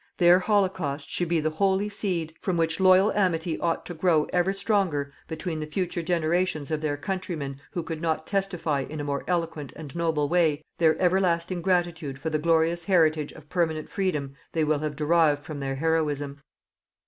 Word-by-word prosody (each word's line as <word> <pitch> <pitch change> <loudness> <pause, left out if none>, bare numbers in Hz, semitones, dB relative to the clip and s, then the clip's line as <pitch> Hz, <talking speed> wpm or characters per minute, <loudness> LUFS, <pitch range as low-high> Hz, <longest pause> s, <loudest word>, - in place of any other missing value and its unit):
Their 175 0 +6
holocaust 185 -8 0
should 175 - 0
be 170 0 +2
the 155 0 0
holy 195 +4 +1
seed 185 -6 -2
from 185 -3 -1
which 165 +1 0
loyal 190 +2 +6
amity 170 -5 0
ought 165 - -1
to 175 - -6
grow 160 -2 +3
ever 180 +1 +2
stronger 190 -9 0
between 160 0 -4
the 155 - -4
future 175 +2 -2
generations 165 -2 0
of 155 -1 -1
their 145 -2 -1
countrymen 150 -5 -4
who 175 - -2
could 160 -1 -5
not 160 -1 -1
testify 180 -7 -1
in 150 +3 -6
a - - -2
more 140 -1 -2
eloquent 165 -5 -2
and 150 -2 -9
noble 160 -3 +1
way 160 -2 +2 0.2
their 160 -2 +4
everlasting 180 -1 +1
gratitude 170 -6 0
for 160 +4 -4
the 155 - +1
glorious 165 +1 +2
heritage 160 -5 +3
of 155 -2 -14
permanent 160 -3 -1
freedom 150 -9 -2 0.2
they 160 - +1
will 150 -1 +1
have 150 -1 -3
derived 150 -1 +3
from 150 -2 -6
their 135 -1 -2
heroism. 145 -2 -1
165 Hz, 180 wpm, -26 LUFS, 150-180 Hz, 0.2 s, Their